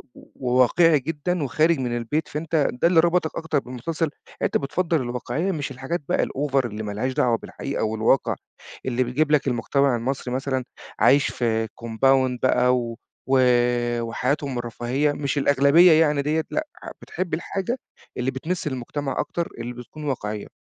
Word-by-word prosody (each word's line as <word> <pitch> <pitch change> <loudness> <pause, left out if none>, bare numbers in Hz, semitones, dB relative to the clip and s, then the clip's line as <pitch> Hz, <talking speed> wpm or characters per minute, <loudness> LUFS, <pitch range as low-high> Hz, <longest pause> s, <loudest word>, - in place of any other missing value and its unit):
وواقعي 130 +5 +2
جدًا 160 +3 -2
وخارج 155 +4 +2
من 120 -2 -1
البيت، 120 +7 -2
فأنت 155 0 0
ده 125 +7 +1
اللي 170 -2 +4
ربطك 170 -1 +2
أكتر 160 -3 0
بالمسلسل، 145 +6 -3 0.3
أنت - - +2
بتفضل 165 +2 0
الواقعية 125 +9 -2
مش 145 -5 -3
الحاجات 135 +6 -4
بقى - - +2
الover 135 -2 0
اللي 110 -1 -5
ما 105 - -4
لهاش 130 +6 -2
دعوة 120 -3 +2
بالحقيقة 140 +1 -5
والواقع، 110 +4 +2 0.5
اللي 130 0 +1
بيجيب 145 +5 0
لك 150 -2 +3
المجتمع 130 +2 +1
المصري 125 +1 -3
مثلًا 130 -1 -1 0.4
عايش 140 0 +5
في 115 -2 0
compound 125 +3 +1
بقى 125 0 +4
و 115 -1 -3 1.1
وحياتهم 130 +3 -1
الرفاهية 120 +5 -1
مش 145 0 -2
الأغلبية 140 +5 +6
يعني 150 -2 +4
ديّة 155 +2 0
لأ 310 0 -1 0.3
بتحب 180 -3 -5
الحاجة 195 +8 -2 0.4
اللي 125 +2 0
بتمِس 160 +6 -3
المجتمع 135 +1 -3
أكتر 170 -1 -2
اللي 120 +1 -5
بتكون 125 +5 -10
واقعية. 105 -7 -3
135 Hz, 150 wpm, -24 LUFS, 125-155 Hz, 1.1 s, الأغلبية